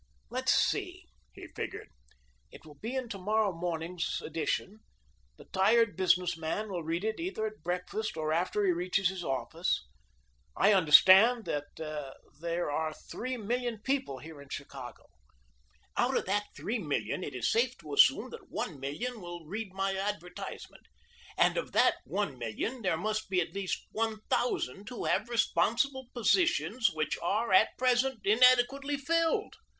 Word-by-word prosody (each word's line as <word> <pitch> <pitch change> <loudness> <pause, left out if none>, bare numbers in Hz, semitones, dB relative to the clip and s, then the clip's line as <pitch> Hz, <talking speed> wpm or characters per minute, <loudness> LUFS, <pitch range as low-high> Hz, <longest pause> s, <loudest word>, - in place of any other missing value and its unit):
"Let's - - +1
see," - - 0 0.3
he - - -11
figured; - - -6 0.6
"it - - -14
will 155 - -12
be 235 +4 -4
in 260 -2 -2
tomorrow 210 0 0
morning's 170 0 -3
edition. 165 +6 -2 0.6
The - - -14
tired 215 +3 +3
business 180 -1 +2
man 165 +7 -3
will 175 -2 -3
read 165 +4 -2
it 220 0 -2
either 335 - -2
at 215 0 -6
breakfast 180 +3 -3
or 155 0 -1
after 185 +5 +1
he 185 - +4
reaches 180 +2 +1
his 190 -2 -5
office. 135 -4 -1 0.7
I 205 +2 +5
understand 190 +7 +7
that 145 -1 -2 0.8
there 170 -2 -1
are 155 +1 -1 0.2
three 255 +1 -3
million 240 +1 -2
people 265 - -1
here 150 +2 -11
in 140 - -14
Chicago. 135 -3 -8 0.9
Out - - +2
of - - -1
that 205 +2 0
three 230 +2 -2
million 140 - -2
it 140 - -6
is 125 - 0
safe 240 +2 +1
to - - -9
assume 430 +1 +5
that 445 -5 -11
one 150 -6 -4
million 210 - -4
will 175 -2 -8
read 200 +4 -5
my 195 0 -1
advertisement, 190 -2 -6 0.5
and - - +4
of - - -3
that - - +4
one 155 -11 -2
million 120 - -3
there 180 -5 +1
must 215 +4 -2
be 185 -1 +2
at 170 - -2
least 195 -2 -3
one 220 -1 -2
thousand 200 - -1
who 245 - -5
have 235 - +1
responsible 235 +4 +1
positions 245 - +2
which 155 -1 -2
are, 205 +4 0
at 200 +4 +5
present, 255 0 +2
inadequately 255 +6 +4
filled. 330 +3 0
200 Hz, 155 wpm, -30 LUFS, 170-235 Hz, 0.9 s, understand